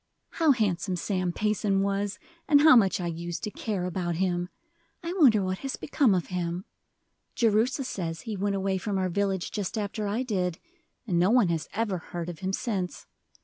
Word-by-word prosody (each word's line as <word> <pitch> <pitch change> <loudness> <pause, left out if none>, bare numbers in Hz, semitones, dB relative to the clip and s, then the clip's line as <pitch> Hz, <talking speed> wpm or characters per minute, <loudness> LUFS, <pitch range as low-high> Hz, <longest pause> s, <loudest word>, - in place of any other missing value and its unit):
"How 325 -2 +2
handsome 195 -5 0
Sam 185 0 -1
Payson 205 0 +1
was, 200 0 -1 0.3
and 290 -2 +6
how 315 -2 +8
much 200 -4 +4
I 180 - -3
use 170 0 -4
to 210 - -4
care 200 -5 -3
about 175 -1 -2
him! 175 0 0 0.5
I 340 +1 -3
wonder 225 - +6
what 185 0 -2
has 270 -1 -4
become 275 -8 +2
of 180 - -2
him! 175 +1 -2 0.7
Jerusha 235 +4 +2
says 165 -9 -4
he 215 +4 -5
went 200 +1 -1
away 195 -1 0
from 200 +1 -2
our 185 -1 0
village 195 0 -1
just 205 0 -3
after 210 0 -2
I 220 +5 -1
did, 180 -8 -1 0.5
and 180 -6 +1
no 180 +3 +4
one 235 -5 +4
has 165 -2 -2
ever 205 -4 -1
heard 170 +1 -6
of 170 - -7
him 190 0 -2
since. 195 -4 -3
195 Hz, 190 wpm, -27 LUFS, 180-215 Hz, 0.7 s, how